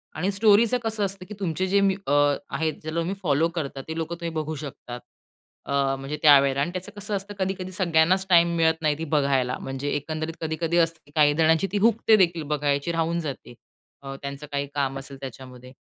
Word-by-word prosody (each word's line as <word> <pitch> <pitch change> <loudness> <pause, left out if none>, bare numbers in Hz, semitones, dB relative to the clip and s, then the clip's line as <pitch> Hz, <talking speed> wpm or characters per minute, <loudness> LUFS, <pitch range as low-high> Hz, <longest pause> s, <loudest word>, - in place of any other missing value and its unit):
आणि 195 +3 -1
स्टोरीचं 215 +4 +4
कसं 220 -2 -1
असतं, 195 -1 -5
की 210 - -9
तुमचे 185 0 -1
जे 200 +1 +3
मी 195 -1 +3
अं, 145 0 +3
आहेत 155 +3 -1
ज्याला 155 +2 -3
तुम्ही 175 +4 -2
फॉलो 150 +1 +2
करता 140 -3 -5
ते 160 - -5
लोकं 165 +1 -3
तुम्ही 165 -1 -4
बघू 155 0 -3
शकतात. 130 -4 -8 0.7
अं, 140 -1 +1
म्हणजे 140 +3 -5
त्यावेळेला 140 -2 +5
आणि 155 - -1
त्याचं 185 0 -6
कसं 205 +1 -3
असतं 200 +1 -5
कधी-कधी 185 -1 -2
सगळ्यांनाच 185 0 +2
टाईम 170 -1 +5
मिळत 160 0 +2
नाही 150 -2 +1
ती 165 - -4
बघायला 135 -3 +1
म्हणजे, 135 +2 -4
एकंदरीत 155 +2 -4
कधी-कधी 160 +1 -1
असते, 165 -1 +2
की 145 - -21
काही 150 -2 +5
जणांची 160 +4 +3
ती 205 - 0
हुकते 225 +1 +4
देखील 170 -4 +2
बघायची 145 +2 0
राहून 165 +1 0
जाते, 140 -6 -6 0.5
अं, 135 0 -6
त्यांचं 140 +1 -6
काही 140 0 -2
काम 135 -1 -1
असेल 135 0 -10
त्याच्यामध्ये 130 -1 -10
160 Hz, 195 wpm, -25 LUFS, 140-185 Hz, 0.7 s, त्यावेळेला